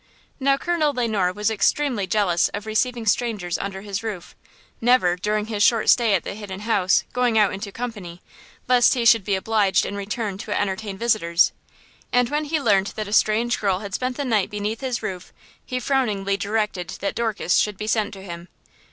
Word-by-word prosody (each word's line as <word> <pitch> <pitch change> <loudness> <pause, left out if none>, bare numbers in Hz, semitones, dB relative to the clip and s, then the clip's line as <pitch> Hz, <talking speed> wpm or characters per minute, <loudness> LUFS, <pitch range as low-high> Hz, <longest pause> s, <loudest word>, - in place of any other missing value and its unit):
Now, 275 0 +3
Colonel 315 -2 0
Le 245 -2 0
Noir 195 -5 +1
was 210 +3 -1
extremely 220 0 +1
jealous 185 -5 +2
of 205 +1 -6
receiving 230 +2 -1
strangers 210 -5 0
under 195 -1 -5
his 200 0 -4
roof, 210 -6 -6 0.5
never, 230 -7 +4
during 210 +3 -1
his 215 -2 -3
short 225 +1 +4
stay 230 -5 +3
at 180 - -1
the - - -5
Hidden 200 -2 -8
House, 200 -4 +2
going 245 -2 +1
out 210 -2 +4
into 200 +1 -6
company, 205 -7 -6 0.5
lest 250 0 +5
he 240 -2 -1
should 230 -2 +6
be 200 0 0
obliged 205 0 +2
in 200 - -4
return 200 0 -4
to 210 -1 -2
entertain 205 0 -3
visitors. 195 -7 +2 0.6
And 245 -1 +2
when 300 +1 0
he 310 +1 0
learned 200 -7 +2
that 215 -1 -4
a 205 - -5
strange 225 +3 +2
girl 195 -3 +1
had 200 -2 -7
spent 255 +3 -2
the 285 - -2
night 220 -6 +1
beneath 210 +3 -4
his 255 -3 -3
roof, 185 -1 -5 0.3
he 255 -1 -3
frowningly 215 -8 0
directed 200 -3 -2
that 200 - -1
Dorcas 220 -6 0
should 210 -2 +1
be 210 - -5
sent 215 -1 0
to 190 - -11
him. 170 -2 -8
210 Hz, 195 wpm, -23 LUFS, 195-235 Hz, 0.6 s, should